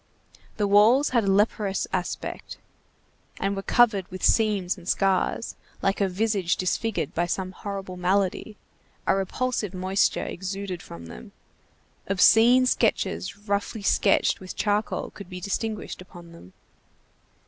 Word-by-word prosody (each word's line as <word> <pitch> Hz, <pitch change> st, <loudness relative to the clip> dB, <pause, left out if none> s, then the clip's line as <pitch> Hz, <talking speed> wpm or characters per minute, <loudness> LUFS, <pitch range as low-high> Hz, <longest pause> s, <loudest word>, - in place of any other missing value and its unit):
The 210 Hz, -, +1 dB
walls 220 Hz, +8 st, +5 dB
had 235 Hz, -4 st, +1 dB
a 195 Hz, -, +2 dB
leprous 205 Hz, 0 st, +1 dB
aspect, 180 Hz, -1 st, -4 dB, 0.8 s
and 200 Hz, +1 st, -1 dB
were 195 Hz, -, -3 dB
covered 215 Hz, -4 st, +3 dB
with 185 Hz, -, -8 dB
seams 205 Hz, -5 st, +2 dB
and 180 Hz, -2 st, -9 dB
scars, 195 Hz, +3 st, 0 dB, 0.3 s
like 195 Hz, +1 st, +1 dB
a 195 Hz, -, +2 dB
visage 195 Hz, -2 st, 0 dB
disfigured 210 Hz, +4 st, -1 dB
by 175 Hz, +1 st, 0 dB
some 185 Hz, +1 st, -3 dB
horrible 195 Hz, -1 st, -6 dB
malady; 195 Hz, +3 st, 0 dB, 0.5 s
a -, -, +3 dB
repulsive 205 Hz, +1 st, -2 dB
moisture 185 Hz, +2 st, +1 dB
exuded 190 Hz, -1 st, -5 dB
from 85 Hz, 0 st, -10 dB
them. 65 Hz, -6 st, -11 dB, 0.7 s
Obscene 225 Hz, +6 st, +5 dB
sketches 205 Hz, -4 st, -1 dB
roughly 200 Hz, +1 st, -2 dB
sketched 195 Hz, 0 st, +2 dB
with 185 Hz, -1 st, -8 dB
charcoal 210 Hz, 0 st, -1 dB
could 200 Hz, -3 st, -11 dB
be 180 Hz, -1 st, -7 dB
distinguished 210 Hz, +2 st, -4 dB
upon 175 Hz, -2 st, -13 dB
them. 95 Hz, -, -15 dB
195 Hz, 130 wpm, -25 LUFS, 185-210 Hz, 0.8 s, walls